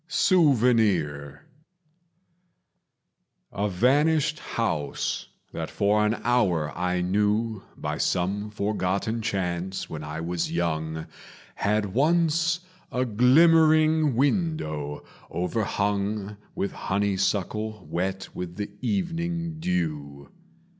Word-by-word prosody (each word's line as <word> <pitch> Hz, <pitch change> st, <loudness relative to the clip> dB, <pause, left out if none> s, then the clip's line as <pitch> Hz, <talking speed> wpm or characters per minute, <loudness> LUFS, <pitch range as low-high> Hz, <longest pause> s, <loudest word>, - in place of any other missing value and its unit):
Souvenir 110 Hz, -, +2 dB, 2.1 s
A 105 Hz, +1 st, -1 dB
vanished 150 Hz, -, +2 dB
house 75 Hz, -11 st, -2 dB, 0.3 s
that -, -, -4 dB
for 105 Hz, +1 st, +2 dB
an 105 Hz, +2 st, +2 dB
hour 90 Hz, -11 st, +1 dB
I 90 Hz, 0 st, 0 dB
knew 105 Hz, +3 st, 0 dB, 0.2 s
By -, -, -3 dB
some 100 Hz, +4 st, 0 dB
forgotten 105 Hz, +1 st, -1 dB
chance 95 Hz, -3 st, -2 dB
when 75 Hz, -1 st, -5 dB
I 75 Hz, +1 st, -5 dB
was 85 Hz, +1 st, -2 dB
young 80 Hz, -2 st, -2 dB, 0.5 s
Had 105 Hz, -1 st, 0 dB
once 165 Hz, -, +2 dB, 0.3 s
a 125 Hz, +1 st, 0 dB
glimmering 155 Hz, +4 st, +5 dB
window 120 Hz, -, -1 dB, 0.2 s
overhung 100 Hz, +1 st, -1 dB, 0.2 s
With 100 Hz, -, -1 dB
honeysuckle 100 Hz, +1 st, -1 dB
wet 95 Hz, +2 st, -3 dB
with 90 Hz, +2 st, -6 dB, 0.2 s
evening 170 Hz, -3 st, -2 dB
dew. 75 Hz, -, -3 dB
105 Hz, 85 wpm, -26 LUFS, 90-135 Hz, 2.1 s, glimmering